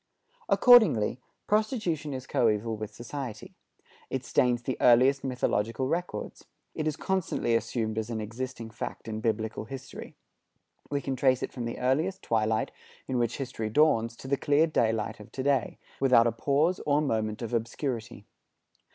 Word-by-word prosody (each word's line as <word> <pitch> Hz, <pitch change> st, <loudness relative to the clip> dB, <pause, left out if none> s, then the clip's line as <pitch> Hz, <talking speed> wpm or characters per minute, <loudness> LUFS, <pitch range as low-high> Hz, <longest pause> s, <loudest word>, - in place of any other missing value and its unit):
Accordingly, 215 Hz, -, +6 dB, 0.3 s
prostitution 210 Hz, -, 0 dB
is 130 Hz, -1 st, -5 dB
coeval 110 Hz, 0 st, +1 dB
with 110 Hz, 0 st, -6 dB
society. 120 Hz, 0 st, -7 dB, 0.6 s
It 130 Hz, -1 st, -3 dB
stains 120 Hz, 0 st, +2 dB
the 130 Hz, -, -2 dB
earliest 130 Hz, +3 st, +5 dB
mythological 125 Hz, -1 st, -1 dB
records. 165 Hz, -9 st, -3 dB, 0.3 s
It 155 Hz, -, -2 dB
is 155 Hz, -, 0 dB
constantly 185 Hz, -10 st, -1 dB
assumed 110 Hz, -1 st, -1 dB
as 110 Hz, +1 st, -4 dB
an 115 Hz, -2 st, -3 dB
existing 115 Hz, +1 st, -6 dB
fact 110 Hz, -, -6 dB
in 110 Hz, -1 st, -3 dB
Biblical 110 Hz, -1 st, -2 dB
history. 135 Hz, +3 st, -9 dB, 0.7 s
We 140 Hz, -1 st, -1 dB
can 135 Hz, -1 st, -2 dB
trace 130 Hz, 0 st, +2 dB
it -, -, -4 dB
from 120 Hz, -2 st, -4 dB
the 115 Hz, -, -4 dB
earliest 155 Hz, +10 st, 0 dB
twilight 110 Hz, -1 st, 0 dB, 0.4 s
in 130 Hz, -1 st, 0 dB
which 120 Hz, -1 st, 0 dB
history 125 Hz, -5 st, -4 dB
dawns 115 Hz, -3 st, +3 dB
to 130 Hz, -, -10 dB
the 140 Hz, +1 st, +1 dB
clear 145 Hz, +3 st, +3 dB
daylight 115 Hz, -7 st, 0 dB
of 105 Hz, -, -13 dB
to 130 Hz, -, -3 dB
day, 140 Hz, -1 st, +1 dB, 0.2 s
without 130 Hz, -4 st, +5 dB
a 120 Hz, -, +3 dB
pause 145 Hz, -, +1 dB
or 145 Hz, 0 st, +4 dB
a -, -, +3 dB
moment 110 Hz, -4 st, -1 dB
of 115 Hz, -, -5 dB
obscurity. 115 Hz, -1 st, -3 dB
125 Hz, 160 wpm, -28 LUFS, 110-140 Hz, 0.7 s, Accordingly